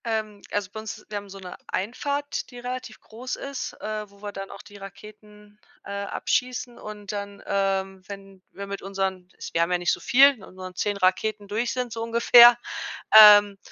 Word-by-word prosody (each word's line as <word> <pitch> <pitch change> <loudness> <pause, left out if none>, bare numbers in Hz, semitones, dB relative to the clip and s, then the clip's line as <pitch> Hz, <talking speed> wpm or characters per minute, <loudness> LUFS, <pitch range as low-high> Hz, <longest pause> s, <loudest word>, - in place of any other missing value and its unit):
Ähm, 215 -3 -3
also 205 -2 -2
bei 220 - -7
uns 215 0 -8
wir 210 - -4
haben 200 0 -8
so 195 - -10
'ne 180 -2 -9
Einfahrt, 285 +8 -3
die 245 - -12
relativ 250 -2 -7
groß 245 +4 -7
ist, 275 -2 -6
ähm, 215 -1 -5
wo 200 0 -22
wir 205 - -5
dann 195 -1 -8
auch 200 - -10
die 205 - -14
Raketen, 210 +1 -14 0.3
äh, - - -8
abschießen. 245 +5 -3
Und 210 -1 -8
dann, 200 -1 -7
ähm, 195 -1 -1
wenn 195 -1 -11
wir 200 - -8
mit 200 0 -6
unseren- 190 -2 -4 0.2
wir 165 - +1
haben 170 +1 0
ja 180 - +2
nicht 175 0 0
so - - -4
viel- 275 +3 +6
mit 195 - -14
unseren 185 -1 -10
10 205 +2 -2
Raketen 200 +2 0
durch 225 +4 -2
sind 250 -2 -4
so 225 - -5
ungefähr, 235 +1 +7 0.6
ähm, 205 -1 +8
205 Hz, 195 wpm, -24 LUFS, 195-230 Hz, 0.6 s, ähm